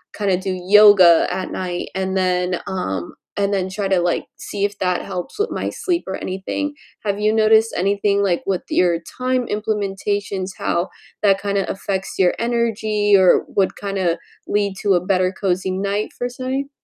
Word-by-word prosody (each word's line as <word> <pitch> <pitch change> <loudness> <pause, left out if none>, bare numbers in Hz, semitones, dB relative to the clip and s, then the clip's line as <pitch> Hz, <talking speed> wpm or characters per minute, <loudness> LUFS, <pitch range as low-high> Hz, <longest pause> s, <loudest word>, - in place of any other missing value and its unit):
kinda 195 -3 +1
do 190 0 -3
yoga 200 -5 +7
at 185 - -3
night 180 -1 -4
and 190 0 -1
then, 180 -1 0
um 95 - -3 0.2
and 200 0 +1
then 190 -1 -1
try 195 +1 -2
to, 190 -2 +2
like, 175 0 0
see 200 0 -3
if 205 0 -4
that 180 -1 0
helps 180 - -6
with 425 - +1
my - - -3
sleep 355 -2 -2
or 190 - -3
anything. 195 +11 -3 0.3
Have 200 0 -1
you 215 0 +3
noticed 220 0 +4
anything, 200 +2 +1
like, 185 -4 +1
with 190 -2 -1
your 175 -2 +2 0.2
time 255 -1 0
implementations, 205 -2 -2
how 175 +2 -1 0.3
that 195 -1 +4
kinda 200 -1 -1
affects 195 0 -4
your 180 -1 +4
energy, 220 -3 +1
or 185 -2 +5
would 195 -2 0
kinda 190 -4 -1 0.3
lead 205 -1 0
to 200 - +3
a 175 - +4
better 185 0 +1
cozy 190 -1 -1
night 200 +3 -1
for 245 - -1
say? 260 +3 -4
195 Hz, 170 wpm, -20 LUFS, 185-210 Hz, 0.3 s, yoga